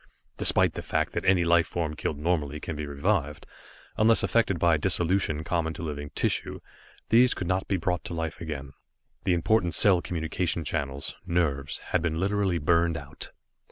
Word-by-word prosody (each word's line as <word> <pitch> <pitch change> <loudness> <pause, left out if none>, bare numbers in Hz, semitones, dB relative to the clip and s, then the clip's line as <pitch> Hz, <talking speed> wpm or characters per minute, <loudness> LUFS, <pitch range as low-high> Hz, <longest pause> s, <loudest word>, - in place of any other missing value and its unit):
Despite - - +4
the - - -5
fact - - -1
that - - -3
any 95 -2 +4
life 85 -1 +3
form 80 -3 -3
killed 75 - -3
normally 75 -2 -1
can 80 - -5
be 75 0 -5
revived, 75 +1 -1 0.5
unless 110 +1 +5
affected 115 -6 +2
by 85 0 +3
dissolution 85 -1 +1
common 80 -1 -1
to - - -7
living 75 -2 -5
tissue, - - -1 0.5
these 120 +3 +5
could 90 - -4
not 95 +2 -1
be 95 - 0
brought 90 0 -2
to 85 - -5
life 80 0 -4
again. 70 -4 -6 0.5
The 90 - +3
important 85 -1 +1
cell 95 -4 +5
communication 85 0 -2
channels 70 -2 -3
nerves 75 -5 0 0.2
had 90 - +3
been 80 -1 -1
literally 95 -1 0
burned 85 +1 +2
out. - - -8
85 Hz, 170 wpm, -27 LUFS, 75-90 Hz, 0.5 s, unless